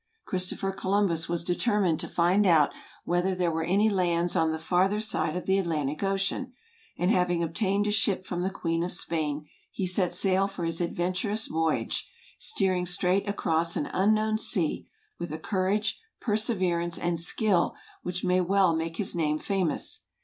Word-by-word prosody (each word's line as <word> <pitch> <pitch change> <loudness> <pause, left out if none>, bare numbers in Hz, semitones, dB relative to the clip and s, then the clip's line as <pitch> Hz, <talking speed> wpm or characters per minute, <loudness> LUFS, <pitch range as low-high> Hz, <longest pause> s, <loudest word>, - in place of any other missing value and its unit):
Christopher 185 +1 0
Columbus 190 -4 0
was 170 0 -1
determined 180 -2 +1
to - - -4
find 185 +4 +2
out 155 -5 +5 0.3
whether 175 +2 +1
there 180 -2 0
were 160 0 -1
any 200 +6 +3
lands 175 -4 +1
on 160 -2 +2
the 160 - -2
farther 185 +5 +1
side 210 -7 -1
of 180 - -5
the 190 +1 +2
Atlantic 155 -5 -2
ocean; 195 +6 -1 0.4
and 180 +3 +2
having 180 -3 +2
obtained 195 +4 0
a 210 - 0
ship 200 -2 +1
from 175 -1 -3
the 185 - 0
Queen 165 -3 -2
of 180 - -3
Spain, 155 -4 -2 0.2
he 190 - -3
set 180 -1 +2
sail 190 +2 +2
for 190 -3 -5
his 165 +1 -1
adventurous 185 +5 -1
voyage; 160 -7 -1 0.3
steering 185 -2 +1
straight 180 +3 +1
across 165 -4 0
an 145 - -2
unknown 215 +2 +2
sea, 175 -7 +1 0.3
with 170 -2 -5
a 155 - -3
courage, 200 - -1 0.2
perseverance, 185 -7 0
and 170 -1 -1
skill, 180 +1 +2 0.3
which 180 0 -4
may 180 0 +2
well 185 -1 +3
make 165 +1 -3
his 200 - 0
name 155 -2 +1
famous. 185 -2 -1
180 Hz, 165 wpm, -27 LUFS, 170-195 Hz, 0.4 s, out